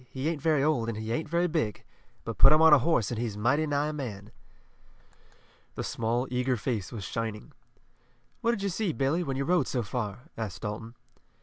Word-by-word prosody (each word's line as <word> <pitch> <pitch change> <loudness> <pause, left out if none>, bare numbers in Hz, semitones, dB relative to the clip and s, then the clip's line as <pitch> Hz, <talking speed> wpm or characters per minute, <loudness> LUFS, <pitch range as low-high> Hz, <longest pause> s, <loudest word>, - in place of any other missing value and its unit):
He 135 +2 -3
ain't 160 -3 -1
very 150 -2 +2
old, 140 -7 +1
and 110 - -3
he 110 +1 -4
ain't 155 +6 -2
very 170 +2 +2
big, 155 - -1 0.4
but 115 - -6
put 135 - +9
him 155 - +6
on 160 -1 +8
a 145 - +8
horse 130 - +1
and 115 - -2
he's 115 -4 -3
mighty 140 +9 +2
nigh 145 +1 0
a - - -4
man." 110 -8 -6 1.4
The - - -3
small, 120 +3 -1
eager 125 0 +1
face 110 -4 -3
was 110 -4 -6
shining. 110 0 -4 0.9
"What 235 - +1
did 225 -4 0
you 200 - +1
see, 185 -1 -1
Billy, 140 +6 +1
when 135 -6 -2
you 140 - -1
rode 180 +3 +2
so 125 -3 -1
far?" 105 -1 -4
asked 105 -5 -5
Dalton. 110 +2 -5
130 Hz, 205 wpm, -28 LUFS, 115-155 Hz, 1.4 s, put